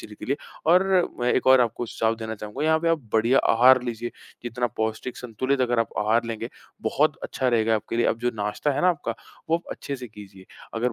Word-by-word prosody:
शरीर 105 - -10
के - - -8
लिए। 140 +2 0 0.3
और, 180 +3 +6 0.4
मैं 120 - +2
एक - - 0
और 130 -1 +7
आपको 120 0 -1
सुझाव 110 0 0
देना 110 0 -5
चाहूँगा, 105 +6 -5
यहाँ 160 0 +4
पे 170 - +1
आप 165 -1 +2
बढ़िया 115 +4 +4
आहार 125 +2 +6
लीजिए। 120 -1 -4 0.3
जितना 120 +1 -2
पौष्टिक, 110 +3 -3
संतुलित 130 +3 -2
अगर 120 -1 +1
आप 115 - 0
आहार 110 +3 +2
लेंगे, 115 0 -4 0.3
बहुत - - +1
अच्छा 130 - -1
रहेगा 115 -2 +2
आपके 110 +2 -3
लिए। 120 - +2
अब 115 - 0
जो 120 +1 0
नाश्ता 105 +7 -1
है - - -1
ना 180 - +5
आपका, 170 -5 -1 0.4
वो 165 - +5
आप 170 - -9
अच्छे 140 - -5
से 125 -1 -8
कीजिए। 100 -3 -13 0.3
अगर 120 +1 0
120 Hz, 225 wpm, -25 LUFS, 110-130 Hz, 0.4 s, और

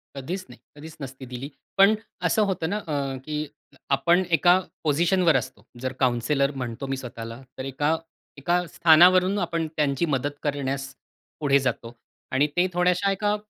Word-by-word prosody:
कधीच 175 +8 -5
नाही 125 - -14 0.2
कधीच 155 +2 -11
नसती 135 -1 -8
दिली. 125 +2 -6 0.3
पण 195 +2 +7 0.3
असं 220 - +2
होतं 165 -3 -2
ना 205 - 0
अ, 160 -7 -5 0.3
की 155 -1 -4 0.6
आपण 175 +5 +3
एका 175 +2 +5 0.3
पोझिशनवर 165 +2 +3
असतो. 115 -3 -5
जर 130 +1 -3
काउन्सिलर 130 +3 +2
म्हणतो 120 +2 -4
मी 135 0 -2
स्वतःला 115 -2 -8 0.2
तर 130 - -4
एका 145 +4 0 0.4
एका 170 +5 +1 0.2
स्थानावरून 180 +4 +6
आपण 165 -1 -2
त्यांची 145 +1 +1
मदत 145 0 -2
करण्यास 135 -2 -3 0.5
पुढे 140 -2 +4
जातो 120 -3 -3 0.4
आणि 135 +3 +3
ते 180 - +4
थोड्याशा 180 +2 +2
एका 205 +2 0
145 Hz, 150 wpm, -25 LUFS, 130-175 Hz, 0.6 s, पण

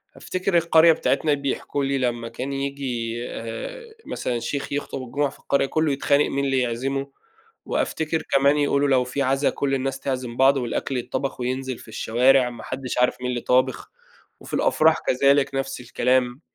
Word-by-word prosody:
أفتكر 185 -1 -1
القرية 165 0 +6
بتاعتنا 155 -1 +1
بيحكوا 140 0 -2
لي 135 0 0
لما 120 -2 -1
كان 130 +4 -5
ييجي، 135 -4 -3
آآ، 465 - -6 0.2
مثلًا 120 -2 -3
شيخ 140 +4 -4
يخطب 140 -2 -3
الجمعة 140 +3 -1
في - - -16
القرية، 140 0 +1
كله 155 +1 0
يتخانق 140 +1 +2
مين 140 0 -1
اللي 135 -1 +1
يعزمه، 135 +3 -2 0.5
وأفتكر 160 0 -1
كمان 140 +2 +4
يقولوا 145 0 +2
لو 130 -2 +4
في 125 +3 -3
عزا 135 +1 +2
كل 135 -1 -2
الناس 135 0 -2
تعزم 125 -3 -4
بعض 135 +1 +5
والأكل 125 +1 -2
يتطبخ 130 +2 -3
وينزل 130 0 -2
في - - -14
الشوارع، 125 +3 +3
ما 120 -2 -10
حدش 130 -1 -5
عارف 125 - +3
مين 125 - -2
اللي 120 -1 -2
طابخ، 130 0 +1 0.5
وفي - - -12
الأفراح 160 0 +3
كذلك 140 +1 +3
نَفْس 135 -1 -3
الكلام. 125 +2 0
135 Hz, 165 wpm, -23 LUFS, 125-140 Hz, 0.5 s, القرية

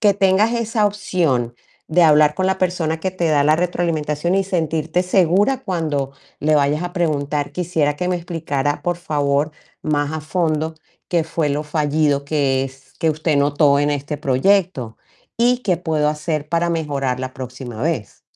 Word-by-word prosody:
Que 205 -2 +5
tengas 195 +3 +3
esa 225 -2 +1
opción, 160 - 0 0.3
de 175 +2 +4
hablar 150 -2 +5
con 185 +4 0
la 190 0 0
persona, 175 -3 0
que 190 - -1
te 175 -2 -1
da 145 -2 +3
la 155 +1 +5
retroalimentación, 170 -2 -1
y 195 - +3
sentirte 165 -2 0
segura 195 +8 +2
cuando 155 -8 -1 0.3
le 155 +1 +3
vayas 145 +2 +1
a 175 0 -4
preguntar: 150 -4 -1
"Quisiera 160 -5 0
que 180 +3 -2
me 180 - +1
explicara, 150 -4 -2
por 175 +1 -1
favor, 145 -3 0 0.3
más 145 -1 0
a 155 - -3
fondo, 160 -1 -1 0.3
qué 170 -2 +2
fue 160 -1 -1
lo 145 +1 -1
fallido 150 -1 0
que 140 -3 +1
es, 135 0 -12
que 165 - +1
usted 155 0 0
notó 145 0 +3
en 145 +1 +1
este 145 +1 -3
proyecto. 140 - +1 0.4
Y 245 +1 +3
qué 185 -6 +1
puedo 155 -3 0
hacer, 150 0 -2
para 170 +1 +1
mejorar 140 -6 -1
la 130 0 -4
próxima 125 -3 -7
vez". 150 - -3
155 Hz, 170 wpm, -20 LUFS, 145-175 Hz, 0.4 s, Que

